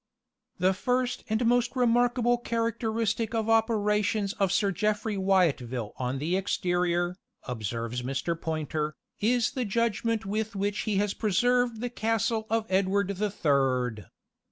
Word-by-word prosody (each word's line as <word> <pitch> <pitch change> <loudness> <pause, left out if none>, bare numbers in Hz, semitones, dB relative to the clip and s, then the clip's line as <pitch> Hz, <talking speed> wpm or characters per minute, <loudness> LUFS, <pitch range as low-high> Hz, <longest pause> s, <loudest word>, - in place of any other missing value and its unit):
"The 185 +1 +3
first 250 +5 -1
and 220 +3 +1
most 245 +2 +2
remarkable 245 0 +3
characteristic 230 -1 -1
of 220 -1 0
operations 210 -2 +2
of 195 -2 +2
Sir 200 0 +2
Jeffry 210 +3 -1
Wyatville 150 - +1
on 130 +1 -2
the 160 +6 -1
exterior," 175 -2 0 0.3
observes 115 0 -3
Mr. 135 +6 -2
Poynter, 155 -2 -3 0.2
"is 235 +2 +2
the 255 - -2
judgment 230 0 0
with 215 +2 -2
which 200 +1 -1
he 210 - +1
has 205 0 +1
preserved 240 +2 +1
the 245 -1 -3
castle 225 -1 0
of 225 0 +1
Edward 195 0 +1
the 200 +2 -1
Third. 130 - 0
205 Hz, 130 wpm, -28 LUFS, 175-230 Hz, 0.3 s, The